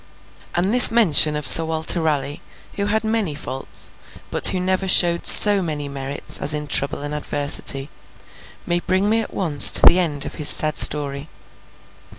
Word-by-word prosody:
And 185 +5 -3
this 250 - +7
mention 170 -9 +1
of 150 -3 -6
Sir 165 - +5
Walter 160 +1 -2
Raleigh, 145 -2 -5 0.3
who 200 0 -6
had 220 +2 -4
many 220 -8 -5
faults, 135 -2 -6 0.4
but - - +4
who 185 - -1
never 185 +1 -4
showed 170 -2 +2
so 205 -2 +6
many 150 -4 -7
merits 140 0 -5
as 150 - 0
in 150 0 -5
trouble 145 0 -4
and 145 0 -8
adversity, 145 -2 -3 0.8
may 175 0 -3
bring 185 +3 -4
me 225 +1 -1
at - - -11
once 155 -7 +3
to - - +5
the 180 - +4
end 150 -6 -5
of - - -10
his 145 - +3
sad 155 -1 +3
story. 145 0 +1
160 Hz, 170 wpm, -17 LUFS, 145-185 Hz, 0.8 s, this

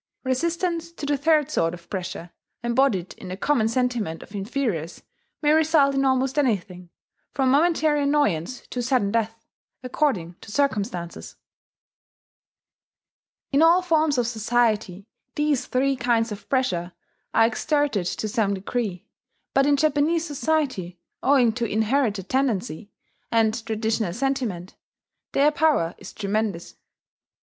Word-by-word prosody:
Resistance 335 +5 -1
to 300 - -6
the 290 0 +1
third 305 +1 +2
sort 165 - 0
of 170 -1 -17
pressure, 180 -2 -5 0.3
embodied 235 -7 +1
in - - -9
the 185 +1 -5
common 240 -1 +2
sentiment 230 -8 -1
of - - -16
inferiors, 200 - -3 0.4
may 295 - +4
result 310 -3 +4
in 275 0 +1
almost 265 +1 +1
anything, 185 -9 -1 0.5
from 265 -2 +2
momentary 310 0 +3
annoyance 260 - 0
to 250 - -2
sudden 240 -5 +1
death, 225 0 -2 0.4
according 230 - -1
to 215 - -11
circumstances. 205 -10 -2 2.2
In 280 +2 +3
all 340 +3 +5
forms 315 -5 +2
of 245 - +2
society 220 -4 0 0.3
these 295 -3 0
three 270 +2 +1
kinds 235 -2 +1
of 210 - -8
pressure 185 -10 0 0.4
are 225 - +6
exerted 255 - 0
to 215 - -3
some 205 -2 0
degree; 195 -1 -3 0.5
but 275 +1 +3
in 290 -1 +4
Japanese 310 +3 +2
society, 280 - -1 0.2
owing 260 -4 +4
to 235 +1 -2
inherited 220 -3 0
tendency, 215 - -1 0.4
and 225 0 +2
traditional 220 -4 -1
sentiment, 240 -7 -2 0.6
their 290 +2 +4
power 295 - +2
is - - -10
tremendous. 205 -3 -2
245 Hz, 125 wpm, -24 LUFS, 200-285 Hz, 2.2 s, are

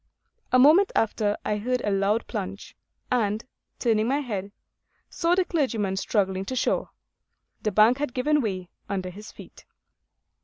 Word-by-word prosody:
A 255 - +5
moment 315 +10 +6
after 210 -1 +1
I 210 - 0
heard 250 +4 -1
a 205 - -1
loud 200 +3 +1
plunge, 195 -3 -6 0.4
and, 220 -3 0 0.3
turning 225 -2 +1
my 270 +3 +2
head, 205 -7 -4 0.6
saw 340 +1 +1
the 370 -1 +2
clergyman 230 - 0
struggling 190 -1 0
to 260 - -4
shore. 250 - 0 0.7
The 215 - -1
bank 215 +6 +5
had 290 -4 -3
given 295 +4 +2
way 185 -6 -3 0.2
under 185 -2 -3
his 210 +4 -11
feet. - - -14
215 Hz, 150 wpm, -25 LUFS, 200-255 Hz, 0.7 s, moment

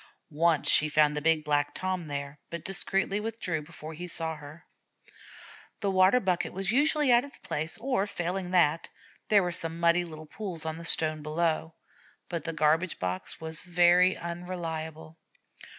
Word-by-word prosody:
Once 165 0 +2
she 155 - +5
found 150 0 +3
the 150 - -2
big 160 0 +2
Black 145 -1 0
Tom 185 -3 -2
there, 140 0 -5
but 170 -1 -6
discreetly 195 +1 0
withdrew 210 -7 -3
before 155 0 -10
he 175 +3 -7
saw 165 -1 +1
her. 150 +3 -12 1.2
The 200 - +1
water 190 +5 +5
bucket 185 -5 -1
was 195 +1 -1
usually 295 +1 +3
at 240 0 +6
its 285 - -10
place, 155 +2 -4
or, 235 -4 0
failing 180 -1 -3
that, 165 -3 +2 0.4
there 205 -2 +5
were 175 - -1
some 165 -1 -2
muddy 170 +1 +4
little 155 -2 -9
pools 175 -2 -6
on 160 0 -3
the 170 - -8
stone 155 -1 +1
below. 160 +1 -1 0.5
But 170 -4 -4
the 165 - -1
garbage 160 +3 +2
box 90 0 -4
was 160 -1 -5
very 180 +1 +4
unreliable. 165 -2 -6
170 Hz, 165 wpm, -28 LUFS, 155-185 Hz, 1.2 s, at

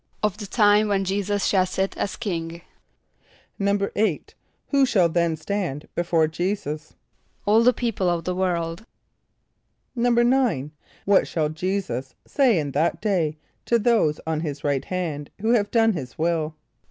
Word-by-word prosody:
=Of 210 -2 +1
the 205 - -6
time 210 0 +4
when 195 -1 +1
J[=e]´[s+]us 200 +1 -1
shall 185 -2 +3
sit 190 +1 -2
as - - -2
king.= 170 -5 -4 1.0
=8.= 200 -2 +1 0.5
Who 280 -1 +3
shall 200 -9 +4
then 170 -1 +1
stand 155 -4 -3
before 170 -2 +2
J[=e]´[s+]us? 160 -2 -3 0.5
=All 215 +2 +5
the 245 +2 +6
people 225 -6 -1
of 170 -1 -1
the 180 - -2
world.= 180 +1 -2 1.1
=9.= 240 - +2 0.3
What 200 -1 +4
shall 155 -2 -1
J[=e]´[s+]us 155 -6 -3
say 255 -8 +3
in 145 -3 -2
that 155 +5 0
day 175 -8 0 0.3
to 235 - +3
those 215 -10 +2
on 160 -1 -1
his 145 -3 -5
right 140 -2 0
hand, 160 -6 -3
who 220 +3 +1
have 210 -4 +2
done 225 -1 +3
his 135 -8 -6
will? 160 -1 0
185 Hz, 145 wpm, -24 LUFS, 160-210 Hz, 1.1 s, the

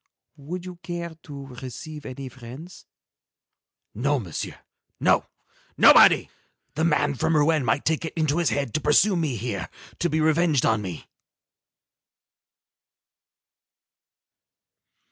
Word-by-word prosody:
"Would 175 +6 -7
you 180 -1 -8
care 175 -1 -6
to 140 -2 -9 0.2
receive 150 +4 -8
any 130 +1 -7
friends?" 130 +7 -11 1.1
"No, 140 +6 0
Monsieur, 95 - -5 0.4
no, - - +2 0.5
nobody. - - +7 0.5
The 160 - -1
man 150 -3 +2
from 150 +5 0
Rouen 150 0 +3
might 135 - 0
take 160 0 0
it 160 - -5
into 155 -1 +1
his 170 - +2
head 140 -5 -2
to 155 - -1
pursue 175 +8 +4
me 155 -7 -1
here, 110 -3 -4 0.3
to 175 - +1
be 160 - 0
revenged 155 -2 +2
on 110 -1 +2
me." 90 -5 -7
150 Hz, 120 wpm, -24 LUFS, 130-165 Hz, 1.1 s, nobody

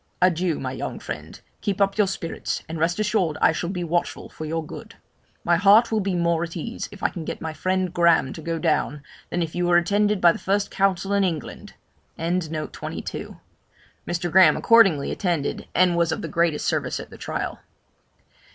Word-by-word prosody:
Adieu! 180 -2 +2
my 130 -1 -3
young 130 - -5
friend; - - -8 0.2
keep 200 -2 -2
up 195 0 +2
your 210 -2 +3
spirits, 170 -3 -4
and 165 0 -5
rest 165 +2 +1
assured 210 -7 0
I - - +5
shall 170 +2 -3
be 180 -2 -3
watchful 170 +1 -2
for 155 - -8
your 160 +1 -3
good. - - -10 0.5
My 170 0 +3
heart 205 +6 +5
will 220 - +2
be 195 -2 -1
more 170 -1 +1
at 170 0 -4
ease, 230 +9 -5
if 200 - -12
I - - +3
can 170 - -7
get - - -5
my 160 -1 -5
friend 185 +1 -1
Graham 170 -6 +3
to 160 - -9
go 165 +1 -2
down, 150 -2 0 0.3
than 175 - -1
if 160 - -5
you 175 0 0
were 175 0 +5
attended 205 +3 +2
by 175 -1 +6
the - - -6
first 200 +1 0
counsel 195 0 +1
in 200 0 +3
England.' 165 -6 -4 0.4
Mr. 170 +1 -5
Graham 185 +2 +6
accordingly 195 -11 +4
attended, 170 -7 -2
and 180 -1 +4
was 170 -1 +2
of - - -3
the - - -3
greatest 170 -3 0
service - - -1
at - - -9
the - - -11
trial. - - -4
175 Hz, 190 wpm, -24 LUFS, 165-195 Hz, 0.5 s, by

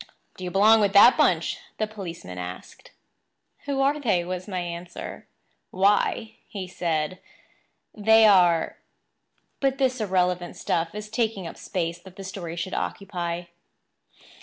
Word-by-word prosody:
"Do 185 - -10
you 180 - -3
belong 215 +4 +5
with 200 -1 +2
that 210 +5 +8
bunch?" - - +2 0.2
the 215 - 0
policeman 170 - -8
asked. 90 +1 -9 0.8
"Who 280 -1 -1
are 285 +2 +2
they?" 195 -10 +1
was 185 +1 -5
my 190 -3 -4
answer. 175 0 -7 0.4
"Why," 205 +3 +1 0.3
said 170 0 -2 0.7
he, 215 - -12
"they 220 +1 +6
are—" 175 -5 +4 0.8
But 270 -1 +1
this 260 -3 +1
irrelevant 180 -3 0
stuff 165 +3 -2
is 210 0 -6
taking 220 -4 -1
up 165 - -7
space 170 -1 -3
that 185 +1 -15
the 195 - -8
story 185 -3 -6
should 175 +2 -4
occupy. 175 -3 -3
185 Hz, 135 wpm, -25 LUFS, 175-215 Hz, 0.8 s, that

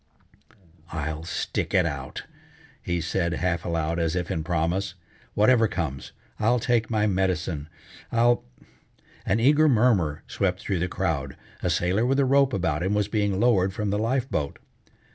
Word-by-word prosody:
"I'll 80 0 -4
stick 85 - -2
it - - +4
out!" - - -5 0.6
he 85 -1 -2
said 85 +1 -1
half 85 0 -1
aloud 85 0 -1
as 85 0 0
if 90 -1 -2
in 80 - -2
promise. 85 +3 -1 0.4
"Whatever 115 +2 +4
comes, 80 -9 -4 0.3
I'll 115 +3 +3
take 120 -1 +1
my 110 -2 +1
medicine, 90 -6 -1 0.4
I'll 120 +1 +3 0.4
" - - -30
An 105 - +2
eager 150 +5 +5
murmur 105 - +2
swept 90 -2 -1
through 95 -3 -2
the 90 - 0
crowd. - - -2 0.2
A - - 0
sailor 90 +5 +1
with 135 +2 +2
a 140 - +4
rope 135 0 +4
about 85 -8 -1
him 95 +4 0
was 105 -1 +1
being 105 -3 0
lowered 100 -5 +3
from 105 -2 -1
the 105 - 0
life 125 +3 0
boat. 75 - -2
95 Hz, 160 wpm, -25 LUFS, 85-115 Hz, 0.6 s, eager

